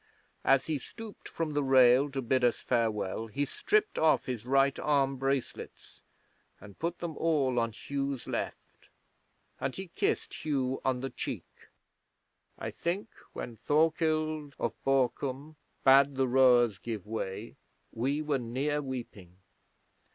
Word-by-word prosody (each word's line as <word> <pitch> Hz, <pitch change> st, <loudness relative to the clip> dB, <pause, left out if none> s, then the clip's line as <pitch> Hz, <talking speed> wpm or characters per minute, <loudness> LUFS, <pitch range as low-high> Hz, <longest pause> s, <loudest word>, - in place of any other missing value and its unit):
As 135 Hz, 0 st, +4 dB
he 155 Hz, -3 st, -1 dB
stooped 220 Hz, -, -10 dB
from 160 Hz, -2 st, -3 dB
the 145 Hz, -, +1 dB
rail 130 Hz, 0 st, +5 dB
to 135 Hz, -1 st, -3 dB
bid 130 Hz, +1 st, +1 dB
us 120 Hz, -1 st, +4 dB
farewell 115 Hz, -3 st, -1 dB
he 140 Hz, +7 st, -1 dB
stripped 420 Hz, -, 0 dB
off 160 Hz, -1 st, +3 dB
his 125 Hz, -2 st, -5 dB
right 135 Hz, +1 st, +3 dB
arm 135 Hz, -2 st, +1 dB
bracelets 135 Hz, 0 st, -4 dB, 0.6 s
and 100 Hz, -1 st, -14 dB
put 170 Hz, +1 st, -2 dB
them 170 Hz, -3 st, -5 dB
all 140 Hz, -7 st, +2 dB
on 115 Hz, 0 st, 0 dB
Hugh's 140 Hz, +2 st, -4 dB
left, -, -, -6 dB, 0.7 s
and 130 Hz, -, -2 dB
he 190 Hz, -1 st, -6 dB
kissed -, -, -2 dB
Hugh 135 Hz, -4 st, -1 dB
on 130 Hz, -1 st, 0 dB
the 135 Hz, -1 st, -4 dB
cheek. -, -, -5 dB, 1.1 s
I -, -, -4 dB
think 185 Hz, +6 st, -3 dB, 0.2 s
when 120 Hz, -, -6 dB
Thorkild 155 Hz, 0 st, +1 dB
of 120 Hz, -, -1 dB
Borkum 135 Hz, +2 st, 0 dB, 0.3 s
bade 135 Hz, +1 st, +6 dB
the 130 Hz, 0 st, +2 dB
rowers 125 Hz, -5 st, +5 dB
give 110 Hz, -5 st, -5 dB
way 105 Hz, 0 st, -5 dB, 0.4 s
we 140 Hz, +6 st, -1 dB
were 145 Hz, -3 st, 0 dB
near 135 Hz, +5 st, -1 dB
weeping. 115 Hz, -9 st, -7 dB
135 Hz, 135 wpm, -30 LUFS, 120-150 Hz, 1.1 s, bade